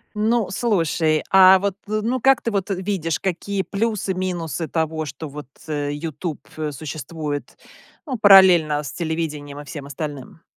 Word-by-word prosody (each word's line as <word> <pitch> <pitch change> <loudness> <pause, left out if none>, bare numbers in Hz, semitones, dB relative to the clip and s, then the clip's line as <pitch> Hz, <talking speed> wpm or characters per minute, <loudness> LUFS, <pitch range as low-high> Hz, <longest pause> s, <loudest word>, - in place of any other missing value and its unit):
Ну, 220 +1 +1
слушай, 165 -7 +1
а 190 0 +8
вот, 200 0 -2
э, 215 0 -1
ну, 250 +2 -1
как 270 +1 +4
ты 230 - -1
вот, 200 -1 -2
э, 195 - 0
видишь, 185 -4 -2
какие 195 +1 -2
плюсы-минусы 185 -6 -2
того, 160 -1 -2
что 145 +3 -7
вот, 145 -1 -9 0.2
э, 145 -2 -2
"Ютуб", 155 +1 -5 0.2
э, 155 -1 -3
существует, 150 0 -6 0.5
ну, 265 -5 -3
параллельно 180 -7 +6
с 140 - -6
телевидением 155 -4 -4
и 145 - -9
всем 140 -1 -8
остальным? 145 +2 -7
165 Hz, 155 wpm, -22 LUFS, 150-195 Hz, 0.5 s, а